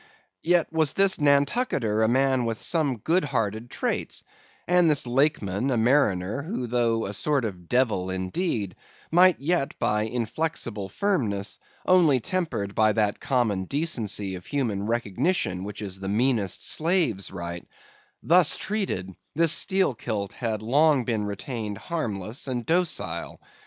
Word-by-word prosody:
Yet 170 -1 +1
was 160 -3 +2
this 195 -1 +4
Nantucketer 140 - +2
a 110 - +4
man 130 +1 +2
with 115 -1 -2
some 150 -7 +1
good 165 - +1
hearted 115 -4 -2
traits; - - -3 0.4
and 180 -2 +4
this 150 -4 +3
Lakeman, 125 -4 0
a 125 - +1
mariner, 110 -3 +2
who 160 - -4
though 115 -1 0
a 100 - -4
sort 140 +3 0
of 90 -5 -7
devil 110 -8 +1
indeed, 95 - -2 0.4
might 180 +1 +5
yet 155 0 -1
by 105 0 0
inflexible 115 -3 -3
firmness, 110 - -1 0.3
only 170 -8 +4
tempered 125 - -2
by 110 0 +3
that 105 -2 0
common 110 -8 0
decency 105 - -1
of 90 -1 -9
human 115 -8 -2
recognition 115 - -1
which 105 +1 -7
is 95 -1 -5
the 95 0 -5
meanest 110 -3 +1
slave's 160 - +1
right; 85 -2 -6 0.6
thus 175 -1 +5
treated, 190 - -3 0.2
this 165 0 +4
Steelkilt 120 - 0
had 110 -3 -3
long 145 +3 +3
been 110 -4 -1
retained 105 +1 -5
harmless 115 - -4
and 125 -3 -3
docile. 155 - -1
120 Hz, 135 wpm, -25 LUFS, 105-155 Hz, 0.6 s, might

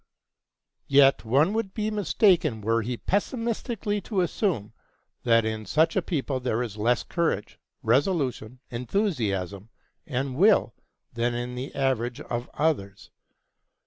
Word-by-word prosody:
Yet 140 -2 +5
one 140 - +3
would 220 -4 -2
be 215 0 -1
mistaken 180 - +2
were 115 +2 +1
he 120 +2 -3
pessimistically 225 - -2
to 195 0 -1
assume 175 - -1 0.5
that 115 -2 +3
in 110 -1 -3
such 160 +9 +2
a - - +3
people 140 -5 -2
there 125 -1 -1
is 110 -4 -6
less 115 +3 +1
courage, 165 - -2 0.2
resolution, 130 - 0
enthusiasm, 115 - -2 0.4
and 135 -2 -2
will 190 - +4 0.4
than 120 +1 0
in 120 +1 -4
the 125 +2 -6
average 125 -3 0
of 120 +1 -4
others. 120 -11 -1
130 Hz, 125 wpm, -26 LUFS, 115-180 Hz, 0.5 s, Yet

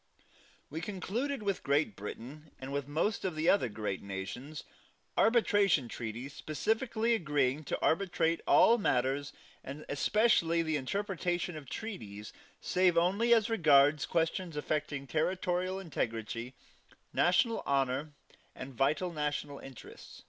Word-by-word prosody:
We 160 +3 -4
concluded 215 +7 -3
with 200 -2 -1
Great 150 +9 +1
Britain, 150 +6 -8
and 135 +1 -6
with 140 -1 -2
most 160 +9 -1
of 180 -4 -2
the 155 +2 -1
other 195 -11 +3
great 105 -2 -4
nations, 105 +10 -6 0.5
arbitration 205 - +3
treaties 120 +4 -6
specifically 220 - 0
agreeing 150 - 0
to - - -2
arbitrate 170 -2 +1
all 235 +1 +6
matters, 135 -4 0 0.3
and 140 +3 -8
especially 170 0 +2
the 160 -1 -1
interpretation 180 +3 -2
of 145 -4 -9
treaties, 105 - -7 0.3
save 180 -2 +2
only 195 +8 +2
as 225 -3 +5
regards 150 -8 +4
questions 165 0 -1
affecting 150 -1 -2
territorial 180 +4 -1
integrity, 120 - -4 0.6
national 225 +6 +3
honor 140 +2 0 0.4
and 130 +1 -8
vital 150 +8 0
national 150 -2 -3
interest. 135 -3 -12
155 Hz, 120 wpm, -32 LUFS, 135-190 Hz, 0.6 s, all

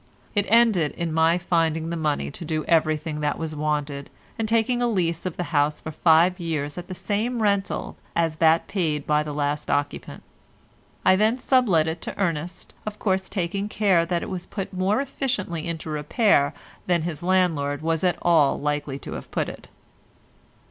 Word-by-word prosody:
It 205 -1 +1
ended 220 -9 +4
in 170 -2 -3
my 165 +1 +4
finding 165 -2 0
the - - -2
money 155 -4 -1
to 155 - -8
do 155 -1 -2
everything 155 -1 +1
that 150 -1 -1
was 160 -1 -4
wanted, 145 -2 -2 0.3
and 225 - 0
taking 230 +2 +1
a 240 - +2
lease 175 -6 0
of 180 - -6
the 180 - -1
house 145 0 +2
for 160 - -6
five 165 +3 +4
years 150 -4 -2
at 175 - -9
the 185 - -6
same 220 +6 -1
rental 200 -1 0 0.2
as 165 -2 +1
that 160 0 +4
paid 155 -7 -1
by 150 0 +2
the 150 -1 -4
last 145 0 -2
occupant. 145 0 -2 0.8
I 185 - +6
then 215 +5 +2
sublet 240 - +3
it 160 +1 -3
to - - -6
Ernest, 170 -3 -3
of 215 0 -5
course 190 -3 0
taking 195 +2 -2
care 195 -6 +3
that 170 0 -1
it - - -6
was 180 -2 -5
put 195 -1 -5
more 190 +6 +1
efficiently 210 - -3
into 160 -1 -4
repair 150 - +2 0.3
than 175 -3 +2
his 165 -3 -4
landlord 165 -6 +1
was 165 0 0
at 180 -2 +2
all 160 -5 +4
likely 145 -1 -2
to - - -9
have - - -7
put - - -1
it. - - -11
170 Hz, 185 wpm, -24 LUFS, 155-190 Hz, 0.8 s, I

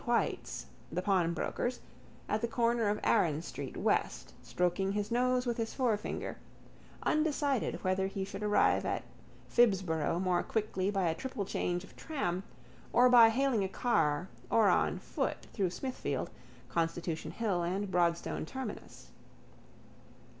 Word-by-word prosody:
White's, - - -1 0.3
the 180 +3 -2
pawnbroker's, 190 +6 0 0.5
at 215 - 0
the 235 - +1
corner 235 -2 +1
of 210 - 0
Arran 155 -2 +2
street - - -6
west - - 0
stroking 180 +2 0
his 210 +1 -2
nose 250 +1 +2
with 240 -1 -1
his 225 -1 -3
forefinger, 230 -5 -1 0.7
undecided 290 -5 +1
whether 190 0 +1
he 195 0 -3
should 195 +1 -7
arrive 210 0 +3
at - - -2 0.4
Phibsborough 180 -8 +2
more 185 -1 +2
quickly 205 -3 -1
by 195 -3 +1
a 160 - +2
triple 205 +3 -4
change 175 -1 -1
of - - -15
tram 185 - -2 0.5
or 250 +1 +6
by 235 -2 +9
hailing 245 -2 +2
a 190 - -2
car 170 -8 +1 0.2
or 220 -3 +5
on - - +2
foot - - -3
through 195 -5 +1
Smithfield, 255 +9 -3 0.4
Constitution 165 0 -2
hill 205 -6 -1
and 190 +3 -2
Broadstone 170 -1 +1
terminus. 265 +11 -7
200 Hz, 135 wpm, -32 LUFS, 175-235 Hz, 0.7 s, by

